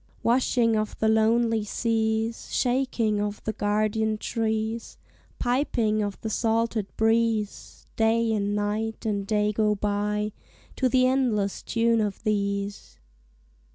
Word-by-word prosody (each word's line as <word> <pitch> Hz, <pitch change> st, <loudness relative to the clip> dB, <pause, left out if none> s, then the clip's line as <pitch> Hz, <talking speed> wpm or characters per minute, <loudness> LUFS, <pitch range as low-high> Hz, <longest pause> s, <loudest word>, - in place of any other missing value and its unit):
Washing 235 Hz, -1 st, +2 dB
of 215 Hz, 0 st, -2 dB
the 220 Hz, -, +1 dB
lonely 225 Hz, 0 st, +3 dB
seas, 225 Hz, +1 st, -1 dB
Shaking 245 Hz, -5 st, +1 dB
of 205 Hz, 0 st, -3 dB
the 220 Hz, -, -2 dB
guardian 215 Hz, +1 st, 0 dB
trees, 220 Hz, 0 st, -2 dB, 0.4 s
Piping 240 Hz, -4 st, +1 dB
of 205 Hz, -1 st, -3 dB
the 220 Hz, -, -3 dB
salted 225 Hz, -2 st, 0 dB
breeze; 225 Hz, -1 st, 0 dB
Day 225 Hz, 0 st, +2 dB
and 205 Hz, -1 st, 0 dB
Night 215 Hz, +2 st, -2 dB
and 200 Hz, -2 st, -1 dB
Day 210 Hz, 0 st, +1 dB
go 210 Hz, 0 st, +2 dB
by 210 Hz, +1 st, -1 dB, 0.5 s
To 260 Hz, -, +2 dB
the 255 Hz, +1 st, +4 dB
endless 245 Hz, -7 st, +1 dB
tune 230 Hz, -1 st, +1 dB
of 205 Hz, -1 st, -3 dB
these. 200 Hz, -1 st, -2 dB
220 Hz, 120 wpm, -26 LUFS, 210-230 Hz, 0.5 s, the